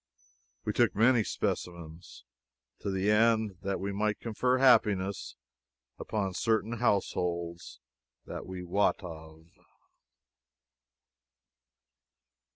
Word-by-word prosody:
We - - -1
took - - +2
many 115 +1 +4
specimens, 85 -6 -5 0.5
to - - -4
the 95 +2 +1
end 110 -2 +3
that 100 0 -2
we 100 +1 -3
might 105 +1 -1
confer 125 +3 0
happiness 100 -7 +3 0.6
upon 100 -3 -2
certain 110 +2 0
households 85 -6 -1 0.5
that - - -7
we 90 -1 -6
wot 100 +3 +1
of. 80 -2 -10
100 Hz, 90 wpm, -30 LUFS, 90-110 Hz, 0.6 s, many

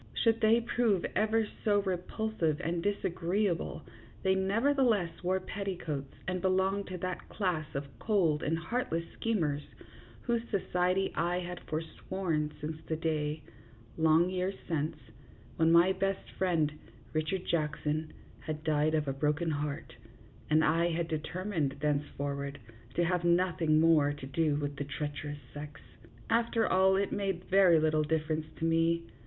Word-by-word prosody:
Should 225 -1 +2
they 225 +2 +5
prove 230 -5 +1
ever 220 +1 +2 0.2
so 205 -2 +3
repulsive 185 -3 -1
and 170 +1 -1
disagreeable, 185 -1 -1 0.4
they 190 -1 +4
nevertheless 210 -2 +2
wore 185 +1 +1
petticoats 180 -8 -4
and 185 -1 -1
belonged 190 +1 +1
to 185 - -5
that 185 +1 -4
class 180 -7 -1
of 140 +1 -2
cold 175 -9 +2
and 160 +2 0
heartless 165 -1 -2
schemers 160 -11 0 0.6
whose 235 -1 +1
society 185 -1 +1
I 175 +1 0
had 180 0 -6
for 155 +1 -1
sworn 160 -3 -2
since 155 +1 -4
the 160 - 0
day, 155 -2 -1 0.5
long 160 +2 +4
years 185 +1 -1
since, 155 -1 -1 0.6
when 160 0 +4
my 170 +3 +6
best 195 +1 -2
friend, 165 -5 +1 0.4
Richard 160 +4 -1
Jackson, 155 -1 -1 0.3
had 155 0 -5
died 155 0 +2
of 150 -2 0
a 135 - 0
broken 150 +4 0
heart, 145 -2 -3 0.6
and 155 +1 +4
I 165 +2 +3
had 165 0 -1
determined 160 -1 -2
thenceforward 145 -1 -2 0.4
to 175 - +3
have 180 0 0
noth 175 0 +2
ing 155 -1 +4
more 155 -3 +5
to 145 -2 -8
do 145 +2 +1
with 145 -1 -3
the 145 - -2
treacherous 145 +1 -4 0.2
sex. 145 -1 -8 0.5
After 230 -1 +2
all, 190 +1 +4
it 200 +1 0
made 195 -3 -1
very 185 -4 +6
little 155 0 +2
difference 155 0 -1
to 165 - -2
me. 165 +1 +2
165 Hz, 145 wpm, -31 LUFS, 155-190 Hz, 0.6 s, my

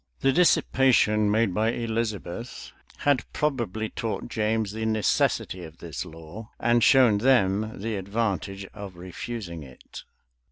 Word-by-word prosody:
[*] - - -44
The 135 - +4
dissipation 130 -10 +3
made 110 -2 +2
by 110 +4 +1
Elizabeth 115 -2 -4 0.3
had 145 -3 +2
probably 115 -7 -1
taught 115 +1 -4
James 110 -2 0
the 110 +1 -5
necessity 110 -4 0
of 80 0 -11
this 75 -8 -6
law, 80 +8 -10
and 120 0 +3
shown 125 -6 +5
them 110 -4 +2
the 110 +1 -3
advantage 100 -1 -2
of 100 -3 -9
refusing 90 0 -6
it. 65 -3 -12
110 Hz, 130 wpm, -26 LUFS, 95-115 Hz, 0.3 s, shown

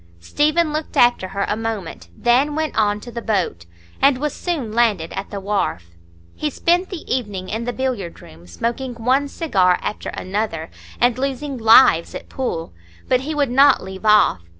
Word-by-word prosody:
Stephen 305 - +1
looked 310 0 -4
after 240 -6 +4
her 200 +1 -2
a - - 0
moment, 210 - -5
then 265 +5 +2
went 315 -1 -2
on 210 -1 +1
to 240 +3 -10
the 235 0 -5
boat, 180 - -2 0.3
and 275 -1 +5
was 295 +2 -2
soon 305 -11 -3
landed 215 -8 +1
at - - -5
the 200 - -5
wharf. 195 - -2 0.4
He 300 - -2
spent 350 +6 +1
the 365 -5 -7
evening 205 -7 -3
in 225 +2 -3
the 245 - -1
billiard 245 -9 -3
room, 85 +2 -15
smoking 240 - -3
one 255 +5 +1
cigar 190 - +2
after 210 - -4
another, 185 -4 -4 0.3
and 245 0 +2
losing 275 +1 -3
"lives" 225 -6 +5
at - - -8
pool. 165 - -4 0.3
But 255 - +3
he 305 +3 -4
would 285 -4 +1
not 275 +2 +5
leave 190 +1 -9
off. 210 - +4
235 Hz, 175 wpm, -20 LUFS, 195-275 Hz, 0.4 s, and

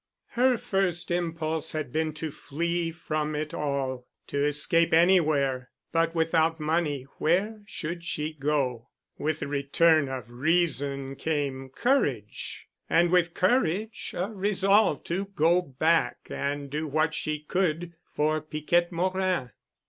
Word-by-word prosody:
Her 250 +1 +3
first 180 -5 0
impulse 160 -2 -1
had 155 -5 -3
been 160 0 0
to 155 +1 -5
flee 170 +4 -2
from 155 -2 -3
it 155 +2 -3
all—to 140 -1 -3
escape 150 +3 +3
anywhere—but 160 -1 +2
without 165 0 +2
money 150 -3 0 0.2
where 205 +7 +1
should 170 -2 -5
she 155 -2 -3
go? 135 -5 -1 0.3
With 155 0 -1
the - - -2
return 145 +1 +3
of 130 -4 -5
reason 140 -1 0
came 140 -4 -2
courage. 255 - -1 0.2
And 170 +1 +4
with 175 -2 +2
courage 210 +1 0
a 185 +5 -2
resolve 195 -3 +2
to 185 +4 -2
go 170 +4 +4
back 160 +2 +1
and 140 0 -3
do 155 +2 -2
what 155 +2 +1
she 155 -1 -1
could 170 +1 -1 0.2
for 155 +1 +1
Piquette 155 +3 0
Morin. 185 -6 0
160 Hz, 125 wpm, -27 LUFS, 145-175 Hz, 0.3 s, And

